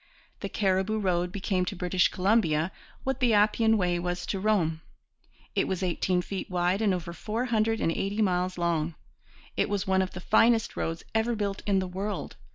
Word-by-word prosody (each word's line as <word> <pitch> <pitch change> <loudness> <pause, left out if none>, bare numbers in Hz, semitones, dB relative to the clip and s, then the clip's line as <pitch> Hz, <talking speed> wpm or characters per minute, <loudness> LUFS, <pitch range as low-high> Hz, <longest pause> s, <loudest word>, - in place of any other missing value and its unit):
The - - -4
Cariboo 190 +1 +1
Road 180 -3 0
became 190 -1 -1
to - - -4
British 180 0 +2
Columbia 180 -4 +1 0.3
what 265 0 -1
the 240 -5 +3
Appian 220 +2 +4
Way 180 -3 +1
was 175 0 -3
to 195 - -2
Rome. 180 -6 +1 0.7
It - - +1
was 190 0 -2
eighteen 180 0 0
feet 195 +1 -5
wide 180 +2 +1
and 210 -3 +3
over 175 -2 -3
four 220 +8 -3
hundred 225 -2 +1
and 165 - +1
eighty 200 +5 -2
miles 180 -3 +1
long. 170 -2 0 0.6
It - - +1
was 200 -1 -1
one 190 -1 +2
of 185 - -3
the 180 - -6
finest 225 +4 +3
roads 165 +1 -3
ever 225 +2 +1
built 200 -2 -2
in 200 -1 +3
the 190 -1 0
world. 195 +3 -4
190 Hz, 185 wpm, -28 LUFS, 180-215 Hz, 0.7 s, Appian